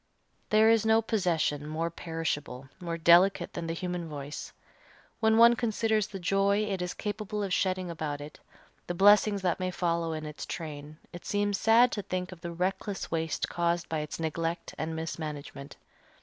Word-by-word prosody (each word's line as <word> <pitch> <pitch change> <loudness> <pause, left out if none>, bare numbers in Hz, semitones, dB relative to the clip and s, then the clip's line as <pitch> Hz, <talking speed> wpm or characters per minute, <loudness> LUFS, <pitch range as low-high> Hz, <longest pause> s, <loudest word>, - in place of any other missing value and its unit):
There 215 +1 +5
is 225 -2 +3
no 220 0 +4
possession 165 -9 0
more 165 +2 -2
perishable, 145 -6 -4
more 170 -2 -4
delicate, 170 +4 +4
than 165 - -4
the 165 - -2
human 175 -1 -4
voice. 145 -1 -6 0.7
When 220 0 +3
one 235 +1 +8
considers 220 -3 0
the 200 - -7
joy 195 +3 +2
it 195 -3 -2
is 180 0 -3
capable 210 0 -3
of 195 -2 -2
shedding 185 -2 0
about 155 -3 -4
it, 145 +1 -10 0.5
the 175 - -3
blessings 205 +1 +5
that 180 0 +1
may 185 0 -1
follow 170 -2 -1
in 155 0 -5
its 150 0 -7
train, 150 -2 -7 0.2
it 175 - -9
seems 205 -1 0
sad 235 +2 +5
to 205 - -2
think 185 -1 -4
of 180 -2 -11
the 170 -1 -5
reckless 190 +3 -3
waste 165 -1 -1
caused 170 0 -1
by 160 - -1
its 150 +1 -5
neglect 165 +1 -3
and 160 +2 -3
mismanagement. 150 -3 -6
175 Hz, 175 wpm, -29 LUFS, 160-205 Hz, 0.7 s, one